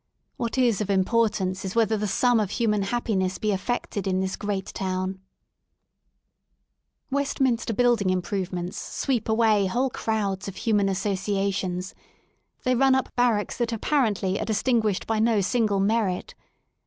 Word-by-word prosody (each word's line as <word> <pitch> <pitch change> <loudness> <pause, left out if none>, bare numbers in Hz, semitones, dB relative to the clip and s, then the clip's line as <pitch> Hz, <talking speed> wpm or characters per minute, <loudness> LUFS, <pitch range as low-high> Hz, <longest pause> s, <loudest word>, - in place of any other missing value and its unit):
What 235 +2 -3
is 235 -5 +3
of 205 - -3
importance 195 -1 +1
is 190 +1 -5
whether 225 -1 +3
the 210 0 -1
sum 245 +4 +3
of 210 -3 0
human 210 -2 +1
happiness 195 -3 -1
be 215 - 0
affected 200 0 -2
in 185 -1 +1
this 190 0 -1
great 205 -2 -3
town 185 0 -2 1.9
Westminster 265 -4 0
Building 235 -3 +2
Improvements 180 -1 -2
sweep 240 -5 -2
away 220 -3 +3
whole 250 +7 0
crowds 205 -5 -2
of 195 - -6
human 205 -2 +1
associations: 195 -1 -1 0.7
they 255 - +2
run 265 +1 +4
up 265 - -2
barracks 235 -4 +1
that 240 -1 0
apparently 215 -6 0
are - - -2
distinguished 220 -1 +1
by 225 -1 0
no 225 -1 +3
single 200 +1 +1
merit. 200 -2 0
210 Hz, 140 wpm, -25 LUFS, 190-230 Hz, 1.9 s, run